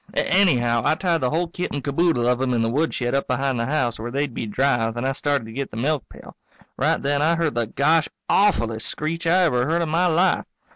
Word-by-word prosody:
Anyhow, 125 -12 +2
I - - +2
tied 170 -2 0
the 130 - +1
whole 170 +4 0
kit 175 +2 -4
and 145 -2 -4
caboodle 145 -2 +1
of 125 0 +2
them 130 -2 0
in 115 - +1
the 115 - 0
woodshed 135 -3 -1
up 140 - 0
behind 130 -1 -1
the 115 - -1
house, 130 -6 -1
where 115 +2 -5
they'd 140 +1 -2
be 115 - -4
dry, 120 0 +1
then 120 +2 -4
I 135 - +1
started 140 -2 -1
to 110 - -10
get 135 +2 -4
the 110 - -9
milkpail. 140 +3 -4 0.4
Right - - +1
then 140 +1 0
I 165 +3 +3
heard 165 -3 0
the 120 -1 -1
gosh 155 +7 +2 0.2
awfullest 115 - +1
screech 165 +2 -3
I 180 +3 +4
ever 125 -6 +1
heard 170 +2 +1
in 160 - -3
my 170 +3 +2
life. 175 +3 +2
140 Hz, 235 wpm, -22 LUFS, 120-165 Hz, 0.4 s, I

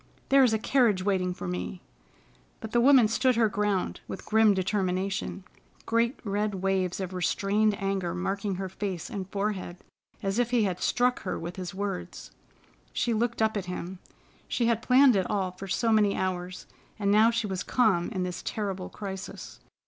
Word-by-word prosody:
There 275 0 +6
is 250 - +4
a 220 - +2
carriage 220 -5 +2
waiting 185 -2 +1
for 180 - -6
me." 180 +1 -4 0.8
But 220 - -7
the 240 - +3
woman 260 -3 +6
stood 250 +3 +2
her 225 -1 +4
ground, 200 -2 -1
with - - -7
grim 220 -2 +4
determination, 190 0 -1 0.4
great 230 +2 +1
red 205 -1 -1
waves 190 -1 0
of 190 -1 -4
restrained 205 +3 +1
anger 195 -3 -1
marking 195 +2 -2
her 190 +1 -4
face 185 -2 -5
and 195 -2 -5
forehead, 195 -3 -3 0.5
as 195 +3 0
if 245 -1 +2
he 240 -3 +2
had 185 -3 -2
struck 250 +1 +2
her 185 - -3
with 175 +1 -6
his 185 0 -6
words. 195 - -5 0.6
She 235 - 0
looked 230 0 0
up 220 0 +1
at 200 -3 -2
him. 180 0 -6 0.5
She 240 - 0
had 230 -1 +1
planned 255 0 +5
it 190 -2 0
all 195 -4 0
for 185 +2 -9
so 225 +5 +1
many 210 -2 +3
hours, 185 -1 -3 0.3
and 200 -2 +1
now 215 +2 +6
she 230 -1 -1
was 190 -3 -3
calm 205 -9 +2
in 190 -5 -2
this 180 -1 -4
terrible 195 -4 -4
crisis. 195 -2 -7
200 Hz, 180 wpm, -28 LUFS, 185-220 Hz, 0.8 s, There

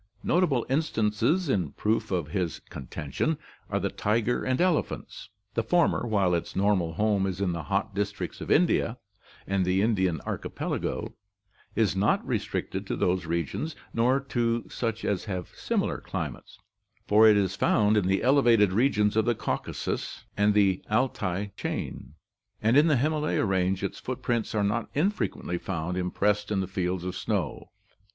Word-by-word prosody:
Notable 155 -9 +2
instances 135 - +1
in 90 - 0
proof 110 +2 0
of 85 -6 -1
his 90 0 -1
contention 70 - -3 0.3
are - - 0
the - - -1
tiger 115 +3 0
and 130 0 0
elephants. 180 -3 -1 0.2
The 115 - +1
former, 120 +1 +2
while 100 -5 +2
its 85 - -2
normal 95 -4 +2
home 100 +1 +1
is 95 -1 -3
in 100 -3 +1
the 85 -1 -3
hot 100 0 -1
districts 100 +1 -3
of - - -6
India 150 -8 +3 0.5
and 95 -1 +1
the 90 +2 +2
Indian 95 -7 +1
archi - - -4
pelago, - - -3 0.6
is 100 -6 +2
not 100 +2 +2
restricted - - -3
to - - -1
those 90 -1 0
regions 85 - -2 0.2
nor 125 +4 +3
to 120 -4 -1
such 115 -2 -3
as 100 -3 -1
have 90 -4 -4
similar - - -1
climates, - - -6 0.5
for 110 +2 +7
it 105 -1 +6
is 100 -1 +1
found 105 +1 +3
"in 100 -3 +2
the 95 +1 +1
elevated 120 -7 +5
regions 105 -2 +2
of 110 -1 +3
the 120 -1 +2
Caucasus - - -3
and 105 +1 +3
the 95 -3 +3
Altai 105 -4 0
chain, 75 +5 -5 0.4
and 110 +3 +2
in 150 +3 +6
the 150 -4 +4
Himalaya 150 0 +1
range 95 0 +1
its 100 - -3
footprints 120 -3 -2
are 105 - +2
not 105 +3 0
infrequently 150 - -1
found 90 -1 -3
impressed 105 +3 0
in 105 -2 0
the 95 - 0
fields 90 -2 -2
of 90 0 -4
snow. 90 -7 -2
105 Hz, 160 wpm, -27 LUFS, 95-120 Hz, 0.6 s, for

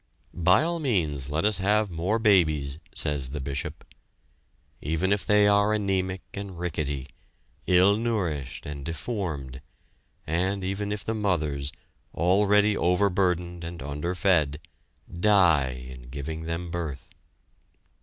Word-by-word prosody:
"By 90 - +4
all 170 +1 -1
means 80 - 0
let 80 +5 0
us 105 -2 +4
have 105 +1 +2
more 90 +7 0
babies," 80 -10 +2 0.2
says 75 -4 +2
the 75 +2 -5
Bishop. 70 0 -5 1.0
Even 80 +6 0
if 100 - -2
they 105 -1 +5
are 100 +1 +4
anemic 95 -3 -1
and 100 -3 -6
rickety, 75 -6 -3 0.6
ill 95 +2 +5
nourished 90 - -2
and 75 -1 -6
deformed, 80 - -4 0.6
and 95 +5 -1
even 100 +2 -2
if 105 0 -3
the 110 - -2
mothers, 75 -10 -1 0.4
already 105 +4 +3
overburdened 90 -2 +1
and 85 -3 -7
underfed, 75 +1 0 0.6
die 80 -11 +3
in 65 -1 -11
giving 80 +4 -5
them 85 +1 -4
birth? 80 -6 -5
90 Hz, 120 wpm, -26 LUFS, 75-100 Hz, 1.0 s, they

